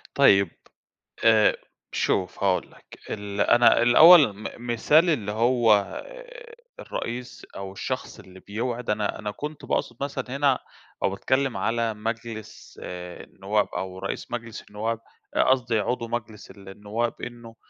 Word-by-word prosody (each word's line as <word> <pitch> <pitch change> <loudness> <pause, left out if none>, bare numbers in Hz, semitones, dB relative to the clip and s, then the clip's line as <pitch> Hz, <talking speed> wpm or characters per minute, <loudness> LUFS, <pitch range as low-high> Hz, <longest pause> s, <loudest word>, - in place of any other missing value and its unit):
طيب، 100 -10 +5 0.7
آآ، 110 -2 +5 0.3
شوف 90 0 -1
هاقول 95 -2 +1
لك. - - -17
ال 100 -1 -4
أنا 120 0 +5
الأوّل 145 - +8
م 110 - -6 0.2
مثال 150 +9 +4
اللي 110 -10 0
هو 115 -2 +2 0.8
الرئيس 125 - -6
أو 95 -1 -6
الشخص 95 - -5
اللي 95 0 -14
بيوعِد، 120 +5 -4
أنا 105 -1 -1
أنا 105 -1 -4
كنت 150 +6 -7
باقصد 120 - -1
مثلًا 140 -2 -3
هنا 140 -2 +3 0.4
أو - - +3
باتكلم 130 +7 0
على 115 0 0
مجلس 115 0 -7
آآ 90 0 -7
النوّاب 100 +2 -1
أو 95 0 -5
رئيس 95 - -5
مجلس 115 -2 -5
النوّاب، 110 +2 -3 0.4
قصْدي 120 -4 +2
عضو 115 +2 -2
مجلس 110 -4 -6
النوّاب 105 +4 -5
إنه 120 -1 -9
115 Hz, 130 wpm, -25 LUFS, 100-120 Hz, 0.8 s, الأوّل